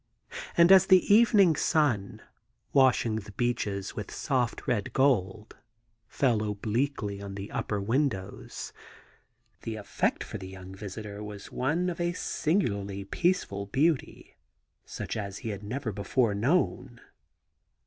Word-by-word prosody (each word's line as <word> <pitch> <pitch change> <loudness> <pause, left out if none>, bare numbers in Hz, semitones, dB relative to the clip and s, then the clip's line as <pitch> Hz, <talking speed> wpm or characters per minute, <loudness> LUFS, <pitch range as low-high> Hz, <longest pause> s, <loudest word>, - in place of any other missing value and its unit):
And 170 +2 +7
as 190 -1 +8
the 190 +1 +5
evening 205 -6 +6
sun, 110 - 0 0.5
washing 130 -5 +4
the 105 -1 -8
beeches 100 -4 -2
with 105 - -5
soft 125 -4 -1
red 110 -5 -1
gold, 110 -6 +1 0.5
fell 120 -5 +1
obliquely 105 0 -2
on 100 -1 -7
the 100 +1 -7
upper 105 - -2
win 130 +9 +2
dows, 95 -5 -8 0.9
the 115 - -4
effect 105 -2 -1
for - - -7
the 95 - -8
young 95 0 -10
visitor 105 +1 -7
was 105 -1 -9
one 155 +8 0
of 175 -1 -3
a 175 0 0
singularly 100 - -1
peaceful 100 - -1
beauty, 145 +6 -1 0.5
such - - -5
as 100 -2 -4
he - - -1
had 100 -2 -5
never 115 +3 -4
before 105 +3 0
known. 125 - 0
110 Hz, 130 wpm, -28 LUFS, 100-140 Hz, 0.9 s, as